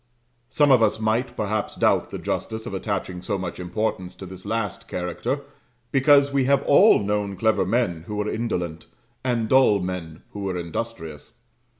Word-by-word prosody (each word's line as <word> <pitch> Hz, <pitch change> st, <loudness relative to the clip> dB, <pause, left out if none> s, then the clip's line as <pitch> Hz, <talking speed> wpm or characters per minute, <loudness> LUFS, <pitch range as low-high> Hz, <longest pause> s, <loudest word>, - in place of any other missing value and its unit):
Some 145 Hz, -2 st, +3 dB
of 125 Hz, -3 st, +6 dB
us 110 Hz, 0 st, +2 dB
might, 110 Hz, +4 st, 0 dB
perhaps, 105 Hz, 0 st, -2 dB
doubt -, -, +2 dB
the -, -, -5 dB
justice 110 Hz, 0 st, -3 dB
of 115 Hz, -, -6 dB
attaching 95 Hz, -2 st, -3 dB
so 100 Hz, +2 st, -2 dB
much 90 Hz, -2 st, -5 dB
importance 90 Hz, 0 st, -3 dB
to 95 Hz, -, -9 dB
this 95 Hz, +1 st, -10 dB
last 110 Hz, -4 st, -3 dB
character, 90 Hz, -1 st, -3 dB, 0.5 s
because 140 Hz, +1 st, +5 dB
we 135 Hz, -2 st, +2 dB
have 140 Hz, +1 st, +3 dB
all 185 Hz, -, +6 dB
known 100 Hz, -1 st, -1 dB
clever 110 Hz, +3 st, +2 dB
men 90 Hz, -9 st, 0 dB
who 105 Hz, -, -4 dB
were 105 Hz, 0 st, -1 dB
indolent, 90 Hz, -8 st, -3 dB, 0.4 s
and 120 Hz, -3 st, 0 dB
dull 130 Hz, -5 st, +5 dB
men 90 Hz, -4 st, -5 dB
who 105 Hz, -, -8 dB
were 95 Hz, -2 st, -2 dB
industrious. 85 Hz, -3 st, -6 dB
105 Hz, 170 wpm, -24 LUFS, 90-115 Hz, 0.5 s, of